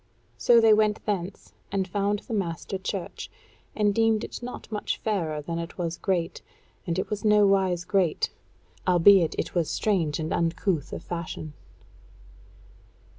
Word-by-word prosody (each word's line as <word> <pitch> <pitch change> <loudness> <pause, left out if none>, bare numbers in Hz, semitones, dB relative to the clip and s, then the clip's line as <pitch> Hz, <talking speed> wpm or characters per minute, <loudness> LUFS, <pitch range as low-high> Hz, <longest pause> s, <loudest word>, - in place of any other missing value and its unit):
So 240 -1 +5
they 225 -1 +6
went 210 0 +2
thence, 195 -2 -4 0.2
and 195 -1 0
found 200 +2 -1
the - - -4
master 190 -1 -3
church, 190 -1 -5 0.5
and 205 -1 +2
deemed 225 0 +2
it - - -6
not 245 -2 -8
much 210 -1 -2
fairer 165 -8 -2
than 165 +2 -3
it 170 0 -7
was 170 -1 -3
great; 180 -4 -1 0.5
and 170 0 -1
it 190 - -2
was 210 +1 -3
nowise 195 -4 +3
great, 185 -4 +1 0.6
albeit 180 -1 +6
it - - -3
was 170 -3 0
strange 170 -9 0
and 160 +1 -2
uncouth 165 -1 0
of - - -6
fashion. 165 -3 -5
190 Hz, 145 wpm, -26 LUFS, 170-210 Hz, 0.6 s, they